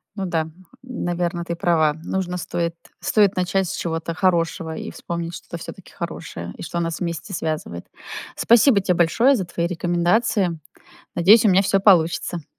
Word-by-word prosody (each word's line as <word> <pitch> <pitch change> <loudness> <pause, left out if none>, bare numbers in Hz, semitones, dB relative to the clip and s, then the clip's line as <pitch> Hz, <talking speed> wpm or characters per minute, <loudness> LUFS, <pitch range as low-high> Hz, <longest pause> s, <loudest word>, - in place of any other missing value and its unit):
Ну 195 -2 -3
да, 165 -3 -1 0.4
наверно, 175 -7 -3
ты 170 - -3
права. 160 -3 +2
Нужно, 180 0 -2
стоит 170 -1 -3 0.2
стоит 205 -2 +3
начать 185 +1 +1
с - - -3
чего-то 165 0 -3
хорошего 165 -2 0
и - - -6
вспомнить 170 0 -5
что-то 170 - -8
всё-таки 185 +3 -10
хорошее 165 - -6
и - - -8
что 170 - -3
нас 165 -1 -2
вместе 170 +3 -4
связывает. 155 - -4 0.5
Спасибо 235 -2 +5
те 185 - +1
большое 225 +11 +3
за 190 - -2
твои 170 0 -2
рекомендации. 175 +1 +1 0.6
Надеюсь, 210 +7 +6
у 215 - +6
меня 190 +1 +5
всё 195 0 +2
получится. 175 -3 +3
175 Hz, 155 wpm, -22 LUFS, 165-190 Hz, 0.6 s, Надеюсь